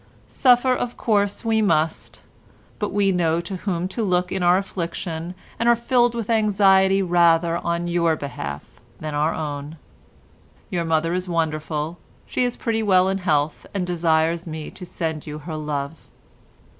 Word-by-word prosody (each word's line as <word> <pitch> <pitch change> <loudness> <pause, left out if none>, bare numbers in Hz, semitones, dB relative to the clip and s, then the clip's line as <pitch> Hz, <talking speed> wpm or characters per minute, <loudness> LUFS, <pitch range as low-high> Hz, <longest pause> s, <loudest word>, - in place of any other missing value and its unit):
Suffer 255 0 +4
of 245 -1 -3
course 205 -2 0
we 220 -1 +2
must, 160 -5 0 0.6
but 210 - -2
we 200 0 +2
know 170 -2 +1
to 185 +2 -6
whom 180 -2 -2
to 230 - -4
look 180 -2 +1
in 190 - -2
our 175 +1 +5
affliction, 170 -2 -4 0.2
and 235 +1 +3
are 235 - +6
filled 240 0 +2
with 230 -3 -3
anxiety 195 -3 +4
rather 170 -1 +3
on 170 0 -2
your 170 -2 +2
behalf 75 - -6 0.3
than 155 -1 -5
our 150 +2 +1
own. 145 0 -5 0.9
Your 175 -3 -1
mother 165 +1 +1
is 180 0 -2
wonderful. 160 0 -2 0.3
She - - -1
is 245 -1 -1
pretty 225 -2 -1
well 190 -3 +4
in 195 0 -1
health, 155 -4 0
and 190 -2 0
desires 165 0 +1
me 155 -1 -6
to 180 - -10
send 160 -3 -4
you 150 0 -5
her 155 +1 -7
love. 150 0 -3
175 Hz, 160 wpm, -22 LUFS, 160-200 Hz, 0.9 s, are